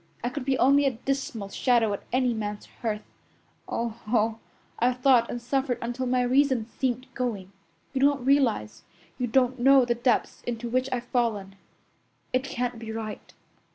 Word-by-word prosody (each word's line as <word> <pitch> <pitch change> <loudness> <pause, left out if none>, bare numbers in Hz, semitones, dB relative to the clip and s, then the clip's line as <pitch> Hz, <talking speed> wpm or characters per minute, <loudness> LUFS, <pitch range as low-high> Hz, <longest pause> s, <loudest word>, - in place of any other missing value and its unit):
I 245 - 0
could 250 0 -5
be 265 -1 +1
only 280 +2 +5
a 255 -4 -1
dismal 265 -7 -2
shadow 230 -2 +2
at 200 - -4
any 250 -1 +2
man's 210 -2 -4 0.2
hearth. 215 -2 -2 0.7
Oh, 230 -1 -3
oh! 225 0 +1 0.4
I've 245 +1 +2
thought 250 -2 +4
and 240 - -3
suffered 255 +1 -1
until 240 +2 -3
my 250 0 +2
reason 260 -2 +3
seemed 250 +1 -2
going. 215 -7 -3 0.4
You 265 - -1
don't 280 -2 +3
realize, 230 - +2 0.4
you 250 - 0
don't 255 +2 +2
know 270 +1 +6
the 240 - +2
depths 240 0 0
into 240 0 -3
which 255 +2 0
I've 245 -2 -1
fallen. 220 -6 -1 0.8
It 255 +1 +2
can't 245 -3 -3
be 225 -1 -6
right." 220 -1 -6
245 Hz, 165 wpm, -27 LUFS, 225-260 Hz, 0.8 s, know